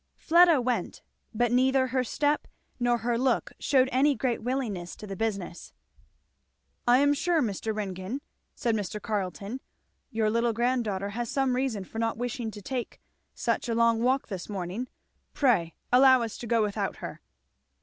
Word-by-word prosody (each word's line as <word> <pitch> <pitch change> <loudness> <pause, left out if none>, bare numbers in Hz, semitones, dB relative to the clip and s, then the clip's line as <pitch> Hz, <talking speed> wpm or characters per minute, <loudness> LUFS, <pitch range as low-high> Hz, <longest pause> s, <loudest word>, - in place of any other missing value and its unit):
Fleda 340 -2 +5
went, 250 0 -2 0.3
but 240 +1 +1
neither 260 +1 +3
her 255 0 +1
step 290 +4 0 0.3
nor 240 0 +2
her 235 +1 -1
look 255 -1 +1
shewed 265 -2 +3
any 275 +3 +3
great 250 -3 -1
willingness 220 -8 -3
to - - -9
the 195 -1 -6
business. 200 -5 -4 1.1
"I 245 +1 +7
am 285 +2 +4
sure, 335 +3 +1
Mr. 220 -4 -1
Ringgan," 195 +5 -4 0.3
said 235 -5 0
Mr. 210 -1 -2
Carleton, 205 +2 -3 0.5
"your 220 -4 0
little 230 +1 +1
granddaughter 225 -5 0
has 235 +2 -4
some 270 -2 +1
reason 250 -6 -1
for 225 +4 -7
not 225 -1 0
wishing 240 -1 -3
to 205 -2 -10
take 250 0 -4 0.4
such - - -1
a 230 - 0
long 230 -1 +3
walk 260 +3 +1
this 190 -2 -6
morning. 195 +5 -4 0.5
Pray 210 - +2 0.2
allow 260 -1 +7
us 225 -2 -4
to 240 - -6
go 230 -1 +3
without 205 -1 -2
her." - - -8
235 Hz, 160 wpm, -28 LUFS, 210-260 Hz, 1.1 s, I